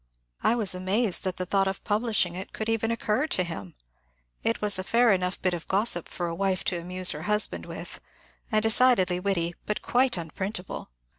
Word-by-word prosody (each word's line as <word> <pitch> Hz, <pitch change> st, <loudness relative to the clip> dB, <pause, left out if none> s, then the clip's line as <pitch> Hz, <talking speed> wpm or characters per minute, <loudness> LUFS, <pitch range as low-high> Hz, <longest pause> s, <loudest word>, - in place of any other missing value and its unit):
I 235 Hz, -, +3 dB
was 215 Hz, -6 st, +2 dB
amazed 190 Hz, +3 st, +1 dB
that 185 Hz, -1 st, -2 dB
the 185 Hz, -, -3 dB
thought 195 Hz, +1 st, +2 dB
of 190 Hz, -, -4 dB
publishing 210 Hz, -4 st, +1 dB
it 185 Hz, +2 st, -7 dB
could 220 Hz, -, -4 dB
even 225 Hz, 0 st, 0 dB
occur 230 Hz, +4 st, 0 dB
to 185 Hz, -, +2 dB
him. 100 Hz, -, -7 dB, 0.7 s
It 230 Hz, -, 0 dB
was 205 Hz, -2 st, +3 dB
a -, -, -2 dB
fair 235 Hz, +4 st, +4 dB
enough 185 Hz, -1 st, 0 dB
bit 185 Hz, -1 st, 0 dB
of 170 Hz, -2 st, -5 dB
gossip 195 Hz, -3 st, +2 dB
for 175 Hz, -, -4 dB
a 170 Hz, -, -3 dB
wife 190 Hz, +1 st, 0 dB
to 175 Hz, -, -1 dB
amuse 180 Hz, +1 st, +1 dB
her -, -, -5 dB
husband 210 Hz, 0 st, +1 dB
with, -, -, -8 dB, 0.5 s
and 215 Hz, -1 st, +2 dB
decidedly 220 Hz, -6 st, +4 dB
witty, 180 Hz, -3 st, -1 dB
but 210 Hz, -, -2 dB
quite 250 Hz, -3 st, +2 dB
unprintable. 180 Hz, -, -5 dB
195 Hz, 195 wpm, -27 LUFS, 180-220 Hz, 0.7 s, fair